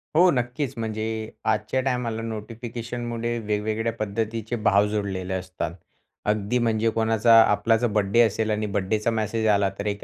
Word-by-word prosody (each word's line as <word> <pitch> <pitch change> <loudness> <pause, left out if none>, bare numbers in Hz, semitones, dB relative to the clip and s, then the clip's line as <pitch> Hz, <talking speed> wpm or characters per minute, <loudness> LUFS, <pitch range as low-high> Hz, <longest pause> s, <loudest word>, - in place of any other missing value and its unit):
हो. 180 +3 +6
नक्कीच. 125 +1 -2
म्हणजे 110 -1 -3 0.4
आजच्या 110 +5 0
टायमाला 125 -4 -1
नोटिफिकेशनमुळे 115 +1 -4
वेगवेगळ्या 110 +1 -1
पद्धतीचे 110 +1 -3
भाव 100 +1 +5
जोडलेले 95 -3 -3
असतात. 90 -3 -4 0.5
अगदी 105 +3 +1
म्हणजे 115 -1 +1
कोणाचा 115 +1 +3
आपला 110 +1 +3
जर 120 +2 +1
बर्थडे 105 0 +1
असेल 110 -1 +1
आणि 105 0 0
बर्थडे 100 +2 0
मॅसेज 110 0 -1
आला 100 -2 +3
तर 100 - -3
एक 100 0 -3
110 Hz, 145 wpm, -24 LUFS, 105-115 Hz, 0.5 s, हो